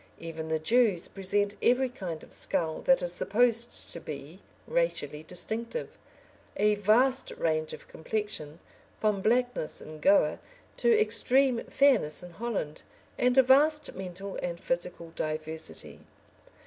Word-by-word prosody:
Even 165 -1 -7
the 160 0 0
Jews 205 +1 +2
present 200 +1 -1
every 255 +2 +3
kind 185 -10 -6
of - - -13
skull 160 -2 0
that 265 -8 +4
is 175 0 -1
supposed 235 +5 0
to - - -6
be 155 +4 -9 0.2
racially 315 - -1
distinctive, 220 - -3 0.6
a 210 +1 +3
vast 230 +6 +3
range 155 -1 0
of - - -10
complexion 165 -5 -5 0.4
from 210 -2 +1
blackness 245 -5 +1
in 155 0 -10
Goa, 295 - +3 0.4
to 460 -2 +4
extreme 270 - +3
fairness 235 - +2
in 180 - -10
Holland 195 -7 -4 0.4
and 250 +1 +2
a 265 - +8
vast 300 +4 +4
mental 190 +1 -7
and 170 -1 -4
physical 170 -1 -4
diversity. 155 +1 -5
200 Hz, 130 wpm, -29 LUFS, 165-245 Hz, 0.6 s, a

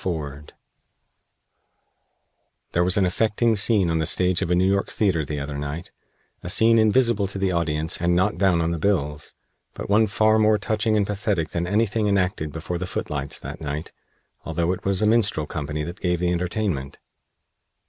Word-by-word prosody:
FORD 75 -5 -5 2.2
There 85 - +2
was 90 +2 +1
an 100 - +3
affecting 110 +4 +1
scene 100 -2 +3
on 80 - 0
the 80 - +1
stage 90 0 +2
of 95 - -1
a 90 - +3
New 90 +1 +2
York 100 +1 +1
theater 95 -7 0
the 75 0 -4
other 70 0 -5
night 75 +4 -6 0.5
a 90 - -6
scene 115 +4 +5
invisible 110 -1 +3
to 100 - -4
the 95 -1 0
audience 80 -2 -1
and 85 0 +2
not 95 +4 +1
down 95 -4 +3
on 85 0 0
the 85 - -3
bills, 75 -6 -1 0.4
but - - -6
one 110 +2 +4
far 110 +2 +3
more 110 0 +4
touching 110 +1 0
and 100 - +2
pathetic 100 -5 -2
than 85 0 -3
anything 105 +2 +1
enacted 90 -6 0
before 85 +2 -5
the 95 - -4
footlights 70 -5 -3
that - - -8
night, 75 +1 -4 0.5
although 85 +1 -1
it 95 - -5
was 95 +1 +1
a - - +4
minstrel 110 -8 +2
company 75 0 -4
that 85 +6 -8
gave 90 -1 +1
the 90 0 0
entertainment. 85 -5 -2
90 Hz, 180 wpm, -23 LUFS, 80-105 Hz, 2.2 s, scene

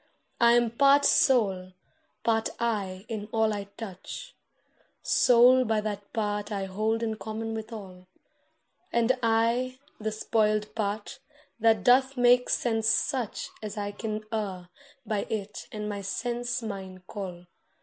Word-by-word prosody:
I 235 0 +6
am 240 -1 +3
part 280 +4 +5
Soul 200 - +3 0.5
part 225 -1 +1
I 200 -5 -2
in 215 -2 -5
all 220 -1 +2
I 200 -1 -4
touch— 225 - -8 0.7
Soul 250 +1 +6
by 220 -2 +1
that 205 -1 -5
part 210 -1 -2
I 200 -2 -2
hold 215 +4 -1
in 220 -1 -2
common 225 +1 -4
with 220 +1 -6
all, 185 -4 -10 0.8
And 235 +2 +3
I 230 +3 +1 0.2
the 220 0 -2
spoiled 215 -1 0
part, 215 +5 -3 0.4
that 220 -3 +3
doth 260 +2 +4
make 245 0 +5
sense 225 -2 +1
such 230 0 0
As 215 0 -6
I 205 0 -2
can 215 +1 -5
err 190 -5 -3 0.4
by 210 -2 -1
it 210 -1 -4
and 210 -1 -4
my 205 -1 -4
sense 240 +4 -3
mine 190 -3 -7
call. 180 -3 -7
220 Hz, 140 wpm, -28 LUFS, 205-235 Hz, 0.8 s, I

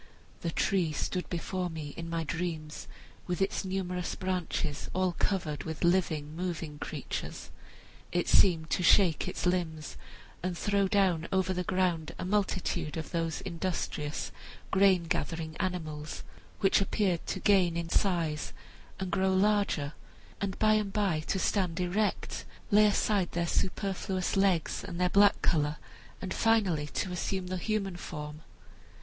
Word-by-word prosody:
The 170 - -2
tree 175 0 +1
stood 180 +4 -2
before 180 +1 -2
me 155 -3 -6
in 165 0 -6
my 165 0 -1
dreams, 160 -1 -4 0.4
with 180 -1 -1
its 195 +1 0
numerous 185 -2 -2
branches 180 -5 -2
all 185 -1 +2
covered 165 -7 0
with 160 +1 -5
living, 160 -4 +1
moving 165 -4 -4
creatures. - - -5 0.6
It 175 0 0
seemed 165 -4 +4
to - - +1
shake 180 -3 +5
its - - -3
limbs 170 -4 -1 0.4
and 180 -1 -2
throw 200 0 +2
down 185 -4 +2
over 190 0 +2
the 180 0 -1
ground 180 -4 0
a - - -4
multitude 185 -5 0
of 160 - -5
those 165 -1 -1
industrious 165 -4 -3 0.4
grain 190 -2 +5
gathering 165 -2 -2
animals, 155 -5 -3 0.4
which 195 0 +4
appeared 190 -3 +1
to - - -2
gain 185 -5 +4
in 170 0 -2
size, 165 -6 0 0.5
and 190 -1 -3
grow 190 +1 +2
larger 190 - +3
and 205 +1 +3
larger, 145 +1 -4 0.5
and 195 -2 -2
by 215 0 +4
and 210 -2 +1
by 195 -7 +1
to - - +1
stand 185 -3 0
erect, 195 +4 -1 0.3
lay 210 +1 +7
aside 200 -2 +1
their 170 0 +1
superfluous 190 +1 -1
legs 190 -4 +2
and 175 -2 -6
their 180 0 +3
black 200 0 +6
color, 150 -2 +2 0.4
and 190 - -4
finally 195 -10 +2
to 180 +5 -2
assume 185 +1 -2
the 185 +1 -3
human 195 -1 -1
form. 150 -3 -7
180 Hz, 150 wpm, -30 LUFS, 165-195 Hz, 0.6 s, lay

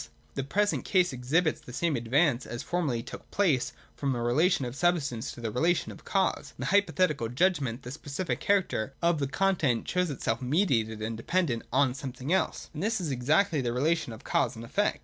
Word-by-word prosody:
The 135 - -2
present 205 +9 0
case 180 -5 +2
exhibits 150 +6 +1
the - - -11
same 160 +4 0
advance 125 +2 +2
as 120 +1 -5
formerly 150 -10 -1
took - - -10
place 165 -11 +2 0.2
from 140 -2 -1
the 120 - -2
relation 135 +6 +2
of 120 +1 -5
substance 145 -8 0
to 120 - -10
the 115 -2 -2
relation 165 +9 +1
of - - -13
cause. 195 -1 0
In - - -5
the - - -1
Hypothetical 185 - +2
judgment 135 -4 +1
the 125 - -7
specific 145 +4 -3
character 185 - 0
of 170 -2 +3
the 140 - 0
content 155 -7 +1
shows 180 -1 +1
itself 120 -4 -2
mediated 125 - +1
and 115 +1 -2
dependent 125 0 0
on 130 0 +3
something 135 +2 -4
else: 190 - -1
and 155 - -5
this 220 +2 0
is 165 -6 -2
exactly 150 +6 +2
the 120 -2 -1
relation 150 +1 +1
of 110 - -10
cause - - +1
and 115 +1 -8
effect. 205 - 0
140 Hz, 195 wpm, -29 LUFS, 120-175 Hz, 0.2 s, of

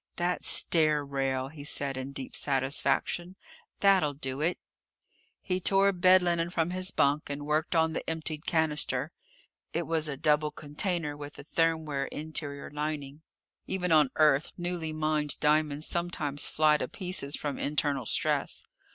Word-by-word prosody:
"That 175 +1 -1
stair 155 -3 +5
rail," 135 -1 -2
he 145 -1 -10
said 140 -2 -2
in 130 +1 -5
deep 135 -1 -7
satisfaction. 145 +6 0 0.5
"That'll 190 -8 +4
do 135 0 -4
it!" 170 +3 +1 0.9
He 185 -1 -1
tore 195 +2 +4
bed 185 0 +5
linen 170 -1 0
from 170 -1 -1
his 185 0 +4
bunk 145 -5 +1
and 145 0 -5
worked 155 +3 0
on 160 0 +2
the - - -4
emptied 160 -1 -4
cannister. 150 -3 0 0.6
It 170 - -1
was 160 -1 -1
a 140 - -4
double 150 +1 +2
container 150 +1 -2
with 145 0 -9
a - - -9
thermware 155 -3 0
interior 145 -2 -5
lining. 150 -1 -4 0.5
Even 180 -2 -2
on 150 -4 +5
Earth 150 -1 +3
newly 175 -2 -3
mined 155 -1 -1
diamonds 150 0 +1
sometimes 165 -5 0
fly 155 -1 +4
to - - -3
pieces 180 -7 -3
from 145 -2 -4
internal 145 -4 -1
stress. - - -1
155 Hz, 150 wpm, -29 LUFS, 145-170 Hz, 0.9 s, stair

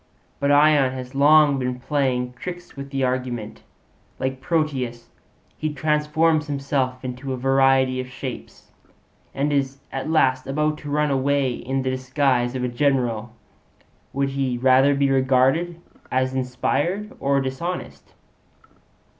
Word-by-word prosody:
But 140 0 +1
Ion 145 -2 +5
has 130 0 -7
long 145 0 +5
been 125 -1 -2
playing 125 -2 -1
tricks 175 +7 -8
with 140 0 -7
the 135 -1 -2
argument; 125 -4 -3 0.6
like 130 0 -3
Proteus, 135 -7 -2 0.5
he 155 0 -1
transforms 150 +1 +1
himself 135 -3 -2
into 130 +2 -4
a - - -3
variety 135 0 +3
of 130 - -8
shapes, 125 - -8 0.6
and 145 +2 0
is 135 -1 0
at 135 +3 -4
last 130 -5 +2
about 150 +2 0
to 145 - -8
run 150 0 +1
away 135 0 +1
in 135 +2 -3
the 130 - 0
disguise 130 -1 0
of 125 - -2
a - - +1
general. 120 -3 0 0.8
Would 140 0 0
he 135 -2 -1
rather 130 +3 +4
be 140 -1 +2
regarded 135 +6 +2 0.3
as 130 0 +1
inspired 140 +10 -1
or 140 0 +2
dishonest?' 135 +7 -5
135 Hz, 135 wpm, -23 LUFS, 130-145 Hz, 0.8 s, Ion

